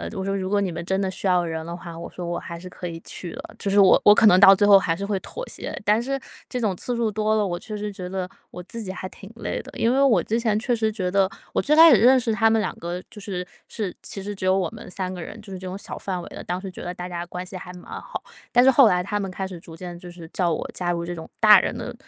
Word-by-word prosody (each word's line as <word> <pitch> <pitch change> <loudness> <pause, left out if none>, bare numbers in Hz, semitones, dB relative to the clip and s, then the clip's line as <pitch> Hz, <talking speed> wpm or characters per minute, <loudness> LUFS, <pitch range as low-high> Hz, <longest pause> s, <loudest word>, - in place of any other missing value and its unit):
我 190 - -3
说” 195 +1 -1
如 190 -1 -3
果 205 0 +2
你 190 -3 -1
们 170 +1 -5
真 190 +1 0
的 190 -1 -1
需 190 - -3
要 180 -1 +3
人 160 -1 -4
的 170 +1 -5
话 170 -1 -9
我 170 - -7
说 180 - -7
我 170 0 -2
还 170 - -7
是 185 +1 -9
可 180 - -7
以 165 -1 -6
去 175 0 -5
的“， - - -10
就 200 - -1
是 200 - +2
我 195 -2 +7
我 205 - +9
可 - - +5
能 185 -2 +7
到 195 0 +9
最 205 +2 +3
后 200 -1 +8
还 165 -3 0
是 200 +4 -4
会 200 -1 -1
妥 - - -7
协。 - - -6
但 210 +2 +3
是 275 +3 -2 0.3
这 250 - -4
种 205 -5 0
次 245 - -3
数 230 -2 0
多 215 +1 +1
了， 215 -1 +2
我 175 -2 -3
确 215 - -7
实 210 0 -4
觉 185 -2 -7
得 185 0 -3 0.2
我 180 - -8
自 230 +5 -7
己 190 -4 -4
还 185 - -6
挺 195 - -13
累 - - -4
的。 - - -12
因 230 +2 +2
为 270 - +3
我 270 -5 +4
之 225 +2 0
前 220 -3 +1
确 245 +3 0
实 220 -2 +1
觉 185 -4 -2
得 195 0 +3 0.2
我 - - +2
最 300 - +3
开 325 +1 +9
始 - - +7
认 255 +5 +6
识 245 -2 0
他 225 0 +4
们 225 0 +3
2 - - -2
个 175 +2 -4
就 220 - -10
是 190 -3 -4 0.2
是 200 -5 -4
其 195 - -7
实 205 +1 -4
只 190 -2 -5
有 185 +1 +4
我 190 - 0
们 - - -11
3 185 0 -4
个 180 - -6
人， 220 - -8
就 210 -2 -11
是 190 - -6
这 185 - -7
种 185 +1 -5
小 - - -7
范 185 -2 -4
围 - - -9
的。 - - -8
当 180 - -3
时 190 0 -7
觉 - - -9
得 175 - -4
大 180 0 -7
家 175 -1 -4
关 180 +1 -6
系 185 +1 -6
还 180 0 -9
蛮 180 - -12 0.2
好， - - -7 0.3
但 245 0 +6
是 265 - +7
后 265 -1 +7
来 180 -3 +2
他 205 +2 -2
们 195 -1 -3
开 190 +1 -4
始 185 -2 -7
逐 165 0 -12
渐 175 0 -8
就 180 - -10
是 175 -1 -11
叫 175 -3 +1
我 - - -4
加 175 -1 -1
入 170 0 -3
这 175 - -4
种 160 -2 -9
大 - - +9
人 - - -2
的 - - -5
190 Hz, 340 characters per minute, -24 LUFS, 180-215 Hz, 0.3 s, 我